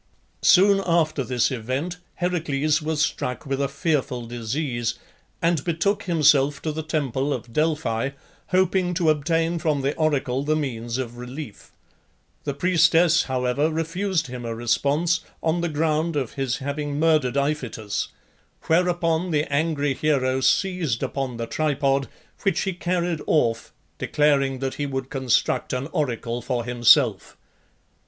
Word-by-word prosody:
Soon 195 +1 +5
after 160 -4 +2
this 125 +1 +1
event 130 +9 -3 0.2
Heracles 155 -4 0
was 155 0 0
struck 125 -6 -2
with 135 0 -2
a 140 - +1
fearful 140 -4 -1
disease, 120 0 -2 0.5
and 165 -4 +2
betook 190 +5 0
himself 145 -5 +3
to 155 - -1
the 155 +1 -4
temple 145 -3 -1
of 120 -4 -5
Delphi, 150 -6 0 0.4
hoping 185 -1 +1
to 165 -3 +3
obtain 165 +3 0
from 155 -3 0
the 140 +2 0
oracle 140 -5 0
the 155 +1 +1
means 120 -5 -3
of 120 -2 -5
relief. 125 -1 -8 0.8
The 140 -2 -2
priestess, 170 0 +4
however, 130 +3 0
refused 165 +2 -1
him 125 -2 -7
a 115 -1 -4
response 145 +9 +1 0.2
on 165 +1 +1
the 170 - -1
ground 155 +1 0
of 135 -5 -2
his 135 -2 -1
having 145 +1 -3
murdered 155 -5 +2
Iphitus, 135 -7 -2 0.6
whereupon 175 0 +1
the 150 -3 +1
angry 145 -2 +1
hero 130 -2 +1
seized 175 - +1
upon 135 -3 -3
the 115 - -3
tripod, 140 -1 0 0.3
which 195 -5 +1
he 190 - -1
carried 175 -2 -1
off, 115 -7 +1 0.3
declaring 140 -3 +2
that 135 -1 -2
he 145 - 0
would 135 -1 -4
construct 130 -3 0
an 130 +1 -2
oracle 120 -4 -2
for 120 -2 -2
himself. 120 -1 +3
145 Hz, 140 wpm, -24 LUFS, 130-165 Hz, 0.8 s, Soon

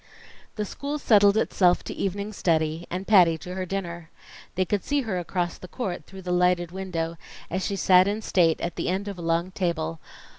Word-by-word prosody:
The 210 - -2
school 285 +8 -4
settled 205 -6 +5
itself 180 -5 +3
to - - -6
evening 200 +2 -3
study, 160 -2 0
and 185 +2 -4
Patty 180 -6 +5
to 180 +3 -8
her 185 0 -4
dinner. 175 -3 -5 0.5
They 185 +1 +1
could 200 +1 -1
see 290 0 0
her 205 -7 -2
across 175 0 -3
the 180 - -9
court, 180 - -4
through 190 -1 -11
the 180 - -3
lighted 180 -1 +2
window, 170 -3 -4 0.3
as 185 +2 -1
she 200 - -1
sat 185 0 +5
in 210 +2 -2
state 165 -6 +3
at 170 - -3
the - - -1
end 190 +3 -1
of 200 -3 -6
a - - -6
long 170 +2 0
table. 170 - -2
180 Hz, 200 wpm, -25 LUFS, 170-200 Hz, 0.5 s, settled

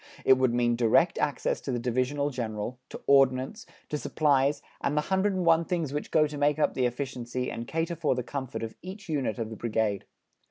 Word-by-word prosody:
It - - +8
would 130 -2 +3
mean 120 0 +2
direct 120 +9 +3
access 145 -3 0
to 135 - -4
the 125 - 0
Divisional 130 +4 0
General, 115 -1 -4
to - - -8
Ordnance, 135 - +3 0.2
to 150 - -2
supplies, 145 -2 +2 0.2
and 145 +2 0
the - - +4
hundred 190 +4 +1
and 185 -2 -1
one 165 0 +5
things 165 -5 -2
which 150 - -3
go 155 -1 +4
to 145 -1 -5
make 145 +1 +3
up 155 - +2
the 125 -1 +2
efficiency 125 -1 -4
and 115 +1 -6
cater 165 +1 -1
for 150 -5 +1
the 125 - -2
comfort 130 -1 -5
of 110 - -5
each 195 +2 -9
unit 135 -9 -1
of 115 -1 -4
the - - -5
Brigade. 110 -3 -1
135 Hz, 210 wpm, -28 LUFS, 120-150 Hz, 0.2 s, It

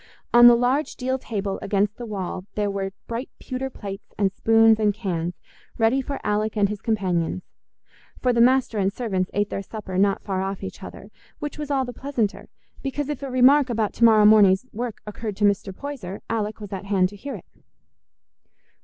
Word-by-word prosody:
On 240 0 +9
the 240 - +8
large 255 +5 0
deal 260 +1 -2
table 200 -5 -3
against 205 +1 0
the 240 - -7
wall 190 -3 -4
there 205 -1 0
were 195 -1 -3
bright 235 +3 -5
pewter 260 0 -4
plates 195 -6 -8
and 195 -2 +2
spoons 225 +1 +4
and 210 -2 +2
cans, 180 -5 -3 0.4
ready 230 +4 +3
for 280 +1 -5
Alick 215 +1 -1
and 200 -1 +3
his 210 -1 -5
companions; 185 -5 -1 0.8
for 250 -1 +2
the 235 - +3
master 250 -3 +3
and 195 0 +1
servants 195 -6 -2
ate 205 0 0
their - - -2
supper 195 -2 -5
not 200 0 +2
far 190 -2 -2
off 195 0 -4
each 195 - -7
other; - - -10 0.3
which 295 0 -6
was 295 -1 -5
all 270 -2 +1
the 245 - -7
pleasanter, 240 -5 -3 0.3
because 280 +1 -3
if 295 -2 -4
a 275 - -4
remark 260 +2 +5
about 225 -3 -1
to - - -2
morrow 220 -2 +7
morning's 210 -1 +6
work 235 0 -5
occurred 210 -1 -6
to 210 - +2
Mr. 200 -1 +1
Poyser, 205 -5 -7
Alick 215 -1 -2
was 205 -2 -8
at 195 +1 -5
hand 195 -2 +2
to 205 - -12
hear 275 +8 -6
it. - - -11
215 Hz, 195 wpm, -24 LUFS, 195-245 Hz, 0.8 s, On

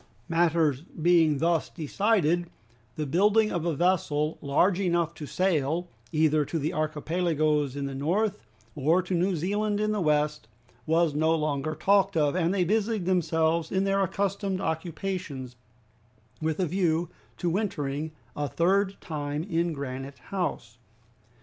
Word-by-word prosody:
Matters 165 -4 +2
being 165 -2 +2
thus 165 +2 +1
decided, 175 0 +1 0.5
the 155 - -2
building 210 +8 +3
of 175 -1 -1
a 165 - 0
vessel 155 -3 +1
large 175 +7 +2
enough 170 -3 +1
to 150 - -8
sail 170 -1 0 0.2
either 155 -1 +3
to 165 - -3
the 155 +1 -1
Archipelagoes 155 -2 0
in 140 -1 -3
the 140 - -4
north, 195 +10 0 0.3
or 160 +8 +2
to 185 - -4
New 180 +2 +1
Zealand 205 +5 -1
in 215 0 +1
the 210 -2 -1
west, 150 -4 +1 0.4
was 165 -1 +3
no 160 +2 +2
longer 155 -1 -1
talked 195 0 +3
of, 150 -2 +2
and 175 -1 +1
they 190 -2 +2
busied 215 +1 0
themselves 165 -2 +1
in 190 0 +1
their 195 0 +1
accustomed 195 0 -1
occupations, 160 -6 -4 0.9
with 160 +1 -1
a 185 - +2
view 170 -1 0 0.3
to 175 - -1
wintering 155 -6 -2 0.2
a 145 0 -1
third 190 +7 +1
time 150 -1 -3
in 170 -2 0
Granite 135 -1 -6
House. 140 - -4
165 Hz, 145 wpm, -27 LUFS, 150-185 Hz, 0.9 s, building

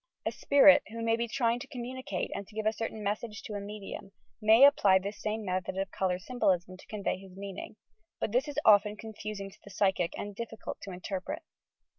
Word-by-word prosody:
A - - +1
spirit, 285 0 +6
who 230 +1 -5
may 225 0 +3
be 235 +1 -1
trying 235 0 +1
to - - -8
com 245 -2 -6
municate 255 -6 -4
and 200 - -5
to 215 - -17
give 220 -1 -2
a 215 - +3
certain 220 -1 -4
message 210 +1 -3
to 215 - -6
a 205 - -2
medium, 200 -1 -8 0.3
may 220 +5 +8
apply 205 -9 +6
this 200 +2 -5
same 215 0 -2
method 185 0 -2
of 195 0 -2
colour 185 -2 0
symbolism 185 -4 0
to 185 - -16
convey 200 -3 -2
his 190 -1 -13
meaning, 200 +1 -7 0.4
but - - -1
this 250 +6 +2
is 290 - -6
often 210 0 +6
confusing 210 -3 -6
to - - -19
the - - -12
psychic 190 -3 +1
and 205 -1 -5
difficult 225 0 -6
to 195 - -7
interpret. 190 - -5
210 Hz, 210 wpm, -30 LUFS, 195-230 Hz, 0.4 s, may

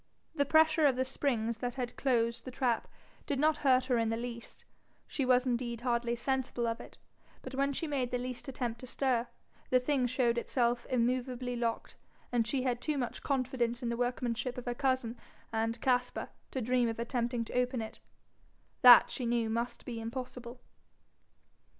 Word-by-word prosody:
The 285 -3 +1
pressure 315 0 +5
of 265 - +2
the 260 +1 0
springs 235 -4 -1
that 245 0 -3
had 250 -2 -4
closed 235 -3 +1
the - - -7
trap 250 -2 0 0.4
did 285 - 0
not 305 +2 +3
hurt 260 -2 +3
her 250 -3 +2
in 225 -1 +1
the 225 - -1
least 235 0 -7 0.4
she 275 - -1
was 250 0 +4
indeed 240 -2 -1
hardly 240 -1 0
sensible 255 -1 -1
of 230 0 -2
it; - - -13 0.5
but 260 - -7
when 275 +1 +1
she 280 - -2
made 275 -5 -1
the 250 - -1
least 250 +1 -5
attempt 245 -3 -3
to 255 - -9
stir, 250 -2 0 0.4
the 255 - +5
thing 255 -1 +1
showed 240 -1 +1
itself 240 0 0
immovably 250 0 0
locked, 235 -1 -2 0.3
and 235 -2 +1
she 255 +3 0
had 245 -2 0
too 305 -2 -1
much 245 -3 -3
confidence 255 -2 -1
in 235 - -1
the 235 - -1
workmanship 245 0 -2
of 250 - -6
her 245 - -1
cousin 255 -3 0 0.4
and 225 +1 0
Caspar 250 -1 0 0.2
to 260 - -3
dream 245 0 +2
of 225 - -4
attempting 235 0 -1
to - - -9
open 250 0 +1
it: 220 -1 -6 0.8
that 245 -2 +9
she 250 - -2
knew 230 -1 +1
must 235 +2 -3
be 235 -2 -5
impossible. 245 +1 -6
245 Hz, 180 wpm, -32 LUFS, 235-260 Hz, 0.8 s, that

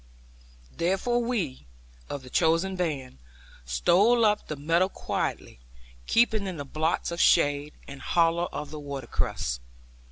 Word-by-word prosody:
Therefore 195 +8 +1
we, 180 - -2 0.4
of 140 - -5
the 125 - -12
chosen 165 +3 +2
band, 145 - -3 0.5
stole 195 - +4
up 210 0 +1
the 155 - -4
meadow 165 +6 +2
quietly, - - -4 0.5
keeping 220 -3 +3
in 185 -3 -4
the 145 - -5
blots 160 +4 -1
of 170 - -1
shade, 145 +1 +3
and 140 -1 -9
hollow 170 0 +2
of 150 0 -6
the 155 - -6
watercourse. 135 - -3
165 Hz, 130 wpm, -27 LUFS, 140-190 Hz, 0.5 s, stole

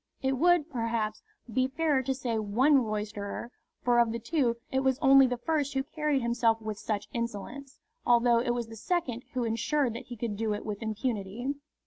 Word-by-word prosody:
It 265 - +2
would, 350 -2 +4
perhaps, 230 -3 -2 0.3
be 255 +2 +2
fairer 290 0 +1
to 265 +1 -1
say 240 -4 -2
one 255 +7 +3
roisterer; 210 +1 -4 0.3
for 240 -1 +4
of 235 -1 +3
the 230 - -2
two 235 -1 0
it 265 - +2
was 265 -1 +2
only 270 -2 +6
the 250 0 -2
first 290 +1 -1
who 270 - +1
carried 300 -2 -1
himself 235 -1 +2
with 215 -1 -5
such 210 -2 -3
insolence, 235 +4 -5 0.3
although 240 -1 +4
it 240 0 0
was 240 -1 -2
the 225 - -10
second 250 - -2
who 255 -1 0
ensured 235 +3 0
that 230 - -8
he 240 - -8
could 215 -2 -3
do 215 -1 0
it 205 - -7
with 210 0 -4
impunity. 220 +2 -2
240 Hz, 190 wpm, -29 LUFS, 225-270 Hz, 0.3 s, only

